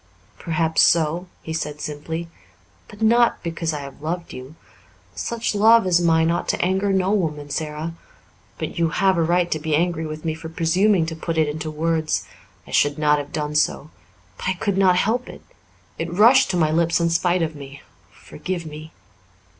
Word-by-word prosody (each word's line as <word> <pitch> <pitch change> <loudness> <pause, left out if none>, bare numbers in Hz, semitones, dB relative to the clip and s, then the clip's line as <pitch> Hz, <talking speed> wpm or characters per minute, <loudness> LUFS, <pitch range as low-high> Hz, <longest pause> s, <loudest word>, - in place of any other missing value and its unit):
"Perhaps 160 -1 +1
so," 170 +2 +3 0.2
he 160 - -5
said 150 -2 -4
simply, 160 +3 -5 0.6
"but 210 +1 -8
not 235 +2 +3
because 165 -1 -2
I 150 -2 -4
have 140 0 -10
loved 170 +3 -4
you. 130 +4 -10 0.6
Such 225 - -3
love 220 +1 +5
as 175 -1 +3
mine 165 -1 +3
ought 175 - -2
to - - 0
anger 190 +2 +1
no 190 0 +1
woman, 150 -8 -2
Sara. 155 +2 -4 0.6
But - - -5
you 165 -1 +2
have 190 +3 +2
a 170 - +1
right 175 +1 +1
to 155 - 0
be 155 0 0
angry 165 0 0
with 155 +1 -7
me 160 - 0
for 160 0 -8
presuming 175 +3 +2
to 160 0 -5
put 165 0 -4
it 155 -1 +3
into 155 +1 -4
words. 160 0 -1 0.4
I - - -14
should 145 +1 +2
not 150 -1 +3
have 145 - -7
done 150 -1 -3
so 150 0 0 0.5
but - - -5
I - - +2
could 185 +2 -2
not 190 -2 +4
help 225 +7 0
it. - - -11 0.6
It - - -3
rushed 230 +7 +5
to 180 - 0
my 155 -2 +2
lips 170 +1 +2
in 170 0 +1
spite 175 +1 +1
of 160 -1 -3
me. 140 0 -11 0.3
Forgive 180 -2 -6
me." 155 +1 -9
165 Hz, 190 wpm, -22 LUFS, 155-180 Hz, 0.6 s, love